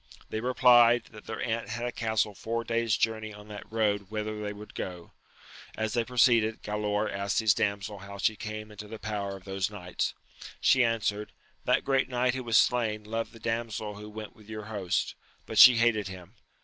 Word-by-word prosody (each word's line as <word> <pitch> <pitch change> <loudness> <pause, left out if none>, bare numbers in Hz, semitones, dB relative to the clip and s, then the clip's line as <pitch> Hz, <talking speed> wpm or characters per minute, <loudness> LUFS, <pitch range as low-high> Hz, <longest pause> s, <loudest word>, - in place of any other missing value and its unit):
They 110 - -1
replied, 120 -1 +5
that 105 -2 -13
their - - -5
aunt 115 0 -2
had 120 0 -3
a 120 - -2
castle 110 -2 0
four 115 +4 -3
days 115 -1 +1
journey 110 -1 -1
on 105 0 -13
that 105 0 -9
road 105 -3 0
whither 110 0 -3
they 105 -1 -3
would 105 +1 -10
go. 90 -2 -6 0.7
As 110 0 -1
they 120 -1 +2
proceeded, 115 -2 +3
Galaor 105 0 -1
asked 100 0 -2
his 110 -3 +4
damsel 100 +1 -2
how 100 +1 -9
she 105 +2 +1
came 110 0 -6
into 105 0 -9
the 110 +1 -7
power 100 -3 -4
of 95 - -16
those 95 0 -2
knights. 90 -4 -3 0.4
She 130 - +5
answered, 105 -2 -1 0.3
That - - +2
great 135 -1 +2
knight 125 0 +1
who 130 0 -4
was 115 -2 +3
slain 110 -3 +2
loved 115 +2 -3
the 115 - -14
damsel 115 -2 -3
who 105 +1 -9
went 110 0 -8
with 105 -1 -18
your 110 -1 -6
host, 95 -4 -1 0.3
but - - -1
she 125 -2 +10
hated 115 -3 +2
him. 95 0 -10
110 Hz, 195 wpm, -29 LUFS, 105-115 Hz, 0.7 s, she